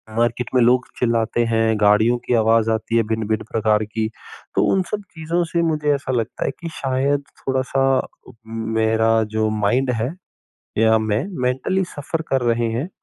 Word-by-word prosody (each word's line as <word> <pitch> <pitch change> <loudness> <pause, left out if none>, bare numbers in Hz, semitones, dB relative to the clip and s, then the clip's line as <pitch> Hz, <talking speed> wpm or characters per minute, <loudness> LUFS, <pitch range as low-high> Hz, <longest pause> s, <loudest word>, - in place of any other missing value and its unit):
Market 120 +1 0
में 125 - +5
लोग 125 +2 +4
चिल्लाते 115 -1 +1
हैं, 115 -1 +1
गाड़ियों 105 +3 +4
की - - 0
आवाज़ 115 0 +3
आती 110 +1 0
है 115 - +4
भिन्न-भिन्न 110 -1 -1
प्रकार 110 -1 +2
की, 110 +1 -3 0.5
तो - - +3
उन 190 - +3
सब 210 - -2
चीज़ों 165 +1 -1
से 170 - +1
मुझे 150 -3 +1
ऐसा 140 -1 -4
लगता 115 -4 -2
है - - 0
कि 170 - -5
शायद 140 +2 0 0.2
थोड़ा-सा 135 0 0
अ, - - -10 0.2
मेरा 110 0 +1
जो 110 0 +2
माइंड 110 +5 +1
है, 125 +7 -2 0.6
या 110 0 +5
में 110 +2 0 0.2
मेंटली 130 +10 0
सफ़र 155 +3 -3
कर 135 -1 +1
रहे 115 0 0
हैं। 130 +10 -3
115 Hz, 170 wpm, -21 LUFS, 110-135 Hz, 0.6 s, में